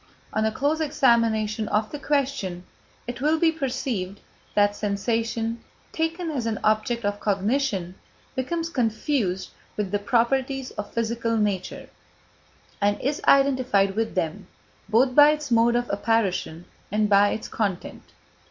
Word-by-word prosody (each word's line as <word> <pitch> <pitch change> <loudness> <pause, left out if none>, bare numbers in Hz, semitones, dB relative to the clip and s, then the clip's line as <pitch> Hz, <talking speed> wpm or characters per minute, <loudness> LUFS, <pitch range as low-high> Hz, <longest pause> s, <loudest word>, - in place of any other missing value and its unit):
On 215 - +1
a 220 - +1
close 290 +7 0
examination 230 -7 +2
of 215 +1 0
the 295 - -5
question, 270 -12 -1 0.4
it 245 +1 -6
will 305 +3 +3
be 325 0 +3
perceived 250 - -3 0.4
that 205 0 +3
sensation, 225 +2 -2 0.3
taken 325 +1 -2
as 250 -6 -2
an 220 -2 -2
object 215 +2 +1
of 205 0 -1
cognition, 205 -2 0 0.4
becomes 330 +6 -2
confused 225 - -1 0.3
with 205 -3 -2
the 205 - +1
properties 255 +4 0
of - - -6
physical 230 0 -1
nature, 205 -4 -2 0.9
and 205 0 +2
is 285 +3 -2
identified 255 -8 +4
with 225 0 -1
them, 165 -3 -2 0.4
both 250 +4 +3
by 290 +2 +8
its 300 -3 -2
mode 235 +1 +4
of 240 0 0
apparition 200 -6 0 0.3
and 210 +1 +2
by 205 0 +5
its 220 - -4
content. 200 -5 -3
230 Hz, 135 wpm, -25 LUFS, 205-270 Hz, 0.9 s, by